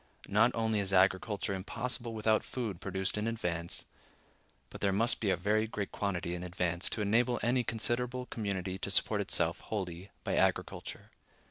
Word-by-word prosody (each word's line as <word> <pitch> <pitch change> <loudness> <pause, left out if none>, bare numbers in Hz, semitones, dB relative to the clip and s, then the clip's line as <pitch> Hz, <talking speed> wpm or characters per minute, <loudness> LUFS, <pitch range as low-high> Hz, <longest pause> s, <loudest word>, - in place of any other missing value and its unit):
Not 110 +4 +5
only 110 -2 +1
is 95 -1 -1
agriculture 95 +2 +2
impossible 115 +5 -3
without 110 0 +2
food 110 -8 -4
produced 95 0 -1
in 105 - -1
advance, 85 -7 -2 0.9
but - - -9
there 100 - +3
must 115 +6 +3
be 105 - 0
a 95 - +3
very 105 +5 +2
great 105 -2 -4
quantity 90 -4 -2
in 90 - -4
advance 90 -1 -1
to 110 - -2
enable 120 +4 +3
any 125 +1 +3
considerable 120 +3 0
community 95 -5 -3
to - - -3
support - - +3
itself - - +2
wholly 95 -3 -4
by - - 0
agriculture. - - 0
105 Hz, 160 wpm, -32 LUFS, 95-115 Hz, 0.9 s, Not